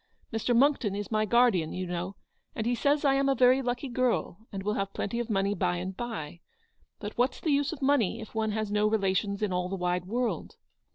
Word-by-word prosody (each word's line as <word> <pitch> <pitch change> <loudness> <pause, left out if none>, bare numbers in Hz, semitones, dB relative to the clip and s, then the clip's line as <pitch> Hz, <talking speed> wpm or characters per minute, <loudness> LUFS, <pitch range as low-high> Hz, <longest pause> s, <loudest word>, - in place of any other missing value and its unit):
Mr. 225 +2 +1
Monckton 250 -6 +3
is 205 0 -5
my 215 -1 +2
guardian, 220 -8 +3
you 185 0 -3
know, 180 +2 -4 0.4
and 220 - -2
he 240 - +2
says 285 +4 +1
I 275 - +5
am 275 0 +2
a 270 - +3
very 255 +1 +5
lucky 245 +2 -2
girl, 240 -4 -1
and 195 -1 -5
will 210 +1 0
have 195 -1 -2
plenty 235 +4 -2
of 240 0 -3
money 200 -1 +1
by 180 -2 0
and 185 +2 -4
by; 195 -10 -5 0.6
but 205 0 -7
what's 250 +3 +1
the 315 - 0
use 285 0 +2
of 295 -4 -6
money 250 -6 +2
if 220 - -9
one 220 -1 0
has 215 -1 -2
no 210 0 +3
relations 200 -1 0
in 200 -3 0
all 180 0 -1
the 195 - -2
wide 180 -1 -1
world 240 +5 -2
215 Hz, 225 wpm, -29 LUFS, 195-245 Hz, 0.6 s, I